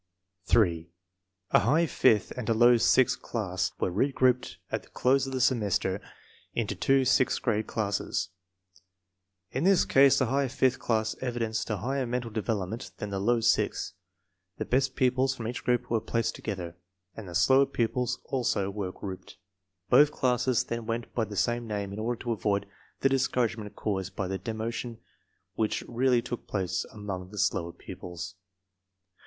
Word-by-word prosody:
8. 85 -6 +3 0.6
A - - +6
high 150 - +3
fifth 110 - +3
and 125 -3 -5
a 115 - +3
low 120 +2 +6
sixth 125 +2 +3
class 95 -6 -2
were - - 0
re 130 +10 +1
grouped 130 -1 +1
at - - -1
the - - -21
close 135 +1 +2
of - - -5
the 130 - -2
semester 105 -6 +1 0.5
into 110 -3 -1
two 135 +7 +2
sixth 130 0 +3
grade 110 -3 0
classes. 100 -5 -2 1.2
In 135 - -2
this 195 0 +4
case 135 0 +5
the 130 - +3
high 135 +3 +1
fifth 130 0 +1
class 110 -2 0
evidenced 115 -3 -2
a 105 - 0
higher 130 +6 -2
mental 120 -1 -3
development 110 +1 -3
than 105 -2 -5
the 100 - -2
low 115 +4 +2
sixth. 110 - +1 0.6
The - - -3
best 135 +1 +1
pupils 130 +1 +2
from 115 -4 -5
each 120 - -5
group 125 -1 0
were 115 -2 +2
placed 115 +1 -1
together, 90 -5 -5 0.4
and 105 -5 -8
the 85 - -7
slower 135 +9 +5
pupils 125 -1 -1
also 105 -7 0
were 100 -2 -4
grouped. 95 -1 -8 0.5
Both 150 0 +7
classes 125 -2 +1
then 115 -1 -5
went 115 0 -3
by 115 - 0
the 105 0 -8
same 120 +1 0
name 100 -2 -3
in 105 - -6
order 115 +2 -2
to 120 - -2
avoid 100 -1 0 0.4
the 135 - +4
discourage 125 -3 +1
ment 105 -2 -8
caused 95 -3 -3
by 95 - -2
the 95 0 -3
demotion 115 +3 -4 0.6
which 110 -1 -1
really 125 0 +2
took 120 -1 -6
place 95 -2 -1
among 100 -4 -6
the 105 - -11
slower 85 -3 0
pupils. 90 +1 -8
115 Hz, 170 wpm, -28 LUFS, 100-125 Hz, 1.2 s, Both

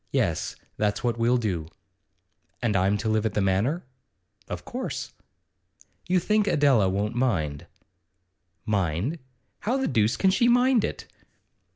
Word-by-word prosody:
Yes; - - 0 0.2
that's 105 -1 0
what 120 -1 0
we'll 120 +2 +3
do.' 90 -9 -2 0.9
'And 115 -4 0
I'm 100 +2 +2
to 105 - -3
live 110 -1 +1
at 105 - -6
the - - +2
Manor?' 100 - +1 0.6
'Of - - -6
course.' - - -5 0.9
'You 180 +1 +3
think 210 +3 +1
Adela 135 - +4
won't 100 +3 -1
mind?' 95 - -1 1.0
'Mind? 100 - -1 0.4
How 245 +5 0
the 265 - 0
deuce 110 -3 +2
can 190 - +3
she 235 +5 +3
mind 245 -1 +4
it? - - -4
115 Hz, 140 wpm, -26 LUFS, -, 1.0 s, Adela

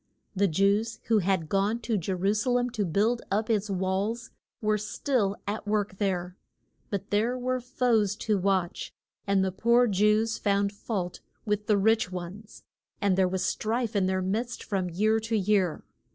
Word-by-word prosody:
The 200 +1 +3
Jews 200 +6 +1
who 225 -2 +5
had 185 -4 0
gone 200 +5 +1
to 230 -1 -1
Je 190 -1 -2
ru 195 +3 +1
sa 215 +4 -1
lem 245 0 +1
to 215 -4 -1
build 210 +8 +1
up 215 +3 0
its 210 -1 0
walls 195 +5 -1 0.3
were 215 -1 +1
still 210 -1 0
at 205 +1 -4
work 205 -2 -1
there. 180 -3 -1 0.5
But 200 -1 -4
there 225 +5 +1
were 255 0 -1
foes 235 -5 +1
to 210 -3 +2
watch, 185 -2 -1 0.4
and 195 -1 +3
the 190 - -1
poor 235 +6 +3
Jews 210 +1 +2
found 200 0 +1
fault 195 -4 -4 0.3
with 210 -1 -1
the 210 - +4
rich 220 -1 +2
ones, 185 +4 -8 0.4
and 200 -2 +2
there 190 0 +3
was 185 0 -1
strife 225 +3 -1
in 190 -2 +2
their 185 0 0
midst 225 +6 -2
from 190 -3 -2
year 215 +6 +2
to 225 0 -1
year. 195 -4 +1
205 Hz, 175 wpm, -28 LUFS, 190-225 Hz, 0.5 s, who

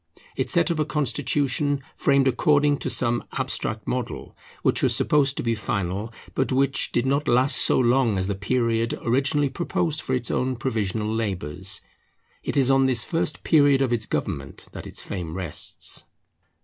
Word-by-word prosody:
It - - -1
set 170 -2 +3
up 165 - -2
a 155 - +2
constitution 145 -1 0
framed 140 -1 +3
according 145 +1 +3
to - - -2
some 120 -1 +1
abstract 110 -1 -2
model, 125 -2 -4 0.3
which - - +3
was - - +3
supposed 140 -2 +2
to - - -2
be 115 -1 +1
final, 100 0 -3 0.2
but 130 - 0
which 135 +1 +1
did 120 - +1
not 140 +3 0
last 125 +3 +3
so - - +4
long 120 -3 +3
as 95 0 -1
the 100 - 0
period 115 +3 0
originally 140 +4 +1
proposed 160 +1 -1
for 130 - -1
its 120 -2 -2
own 130 0 0
provisional 110 -3 -2
labours. 95 -3 -3 0.6
It - - -3
is 135 -1 +4
on 135 0 +4
this 125 -4 +2
first 165 -2 -2
period 145 -4 +4
of 125 -2 0
its 110 -2 -1
government - - -4
that - - -8
its - - -6
fame 85 -4 -5
rests. 90 -5 -3
130 Hz, 170 wpm, -24 LUFS, 110-140 Hz, 0.6 s, so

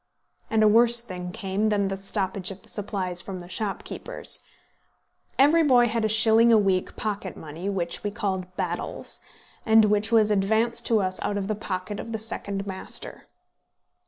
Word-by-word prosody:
And 220 -1 +3
a - - +6
worse 235 +2 +6
thing 180 -6 -6
came 205 +1 -1
than 200 -2 +1
the 195 - -2
stoppage 195 -1 -1
of 195 +1 -8
the - - -18
supplies 190 -4 -3
from 190 -1 -7
the 175 - -10
shopkeepers. 215 - -4 0.9
Every 295 +5 +5
boy 250 -6 +4
had 230 0 -1
a 220 - +1
shilling 220 +2 +5
a 225 - +7
week 195 -3 +1
pocket 205 -4 -4
money, 160 +5 -6
which 175 -4 -3
we 205 - -1
called 190 -3 -3
battels, - - -4 0.4
and 220 -1 +5
which 210 +1 +1
was 215 -2 +4
advanced 220 +4 +1
to 225 -3 +3
us 185 0 -3
out 205 - -1
of 195 -1 -3
the 215 - 0
pocket 200 -1 -5
of 230 - -6
the - - -1
second 200 -2 -4
master. 190 -1 -6
205 Hz, 175 wpm, -25 LUFS, 190-220 Hz, 0.9 s, a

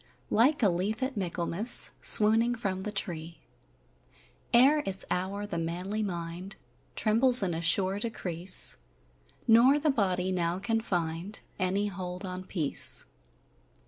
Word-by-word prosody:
Like 260 +5 +2
a 205 - +4
leaf 200 +7 -3
at 260 0 -4
Michaelmas 185 +3 0
Swooning 225 +3 +6
from 195 -5 -5
the 210 - -6
tree, 170 -4 -6 1.1
Ere 275 +5 +4
its 195 0 -4
hour 195 +3 -4
the 170 -5 -5
manly 180 +6 -5
mind 175 -1 -7 0.4
Trembles 235 +2 +6
in 180 -3 -2
a 165 - -5
sure 190 +3 +4
decrease, 185 -5 0 0.7
Nor 240 +5 +4
the 300 0 0
body 185 -6 -2
now 175 -1 -2
can 225 +4 -3
find 175 0 -4 0.2
Any 190 +2 -1
hold 185 -2 -7
on 185 0 -8
peace. 160 -7 -2
195 Hz, 130 wpm, -27 LUFS, 180-220 Hz, 1.1 s, Swooning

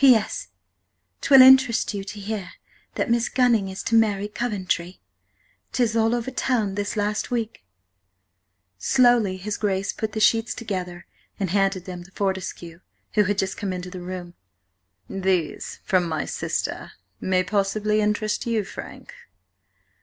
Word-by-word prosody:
"P 265 -3 +8
S.–'Twill 255 +4 +1
interest 260 -4 +6
you 200 -1 -4
to 205 +2 -7
hear 200 -3 -5 0.4
that 235 - -1
Miss 235 0 +2
Gunning 240 -6 +2
is 190 +1 -6
to - - -3
marry 210 -3 +3
Coventry. 190 -5 -3 0.7
'Tis 235 -3 +1
all 225 +1 +3
over 240 +2 -3
Town 240 -6 0
this 205 +1 -3
last 210 +1 -1
Week." 230 - -3 1.2
Slowly 240 -7 +3
his 205 +3 -4
Grace 195 -2 -1
put 220 -1 -4
the 220 - -2
sheets 225 +2 +3
together 180 -6 -5 0.3
and 190 -4 -1
handed 195 -2 +1
them 180 -2 -7
to 180 - -16
Fortescue, 190 -4 -4 0.3
who 210 -1 +4
had 205 +1 0
just 190 0 -1
come 200 -2 -3
into 180 0 -5
the 180 -1 -7
room. 175 -1 -7 0.7
"These, 190 -4 -2
from 180 -2 +2
my 160 - -2
sister, - - -3 0.3
may 185 -1 +1
possibly 210 +2 0
interest 210 +2 -1
you, 225 -3 +1
Frank." - - -10
205 Hz, 145 wpm, -24 LUFS, 185-225 Hz, 1.2 s, P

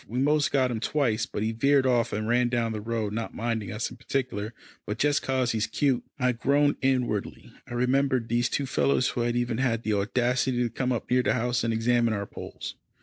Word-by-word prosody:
We 120 - -5
most 150 +3 +2
got 130 -3 +2
him 115 - -2
twice, 115 -4 0
but 105 - -3
he 110 - 0
veered 140 +4 +3
off 120 -2 +2
and 110 +1 -2
ran 120 +1 +3
down 120 -2 0
the 105 -1 -4
road, 110 -2 -2
not 115 +1 -4
minding 115 -2 -2
us 110 +2 -3
in 125 - -11
particular, 125 -4 -3 0.3
but 105 - -4
just 145 +3 +2
'cause 130 -2 0
he's 110 -1 0
cute." 135 -4 +1
I 125 -2 +2
groaned 140 +4 +2
inwardly. 125 -6 -1
I 120 - -6
remembered 130 0 +1
these 120 +1 +1
two 140 - -1
fellows 130 -1 +2
who 120 - -2
had 120 0 0
even 120 -1 -1
had 120 -3 0
the 110 - 0
audacity 125 +4 +1
to 120 - 0
come 130 -1 -1
up 120 -1 -3
near 125 0 +4
the - - +1
house 125 0 0
and 115 - +1
examine 115 0 +2
our 100 0 -3
poles. - - -8
120 Hz, 220 wpm, -27 LUFS, 115-130 Hz, 0.3 s, near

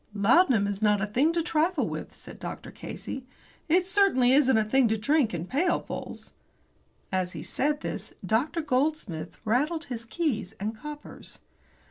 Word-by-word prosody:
"Laudanum 230 - +4
is 200 0 -3
not 210 -1 +4
a 205 - 0
thing 255 +10 +2
to 335 -1 0
trifle 325 0 +1
with," - - -6
said - - -11
Dr. - - -7
Casey. 265 -1 -7 0.4
"It 360 +3 +4
certainly 370 -11 +4
isn't 265 -4 +5
a 220 - +3
thing 250 +4 +3
to 220 0 +1
drink 265 +2 +2
in 170 -1 -3
pailfuls." 325 - -2 0.8
As 185 -1 -1
he 155 -2 -6
said 295 +2 -1
this, - - -5
Dr. 290 +10 +1
Goldsmith 255 - -1
rattled 295 +9 +1
his 230 -2 -6
keys 230 - -2
and 215 +3 -3
coppers. 295 +6 -9
260 Hz, 155 wpm, -27 LUFS, 215-310 Hz, 0.8 s, isn't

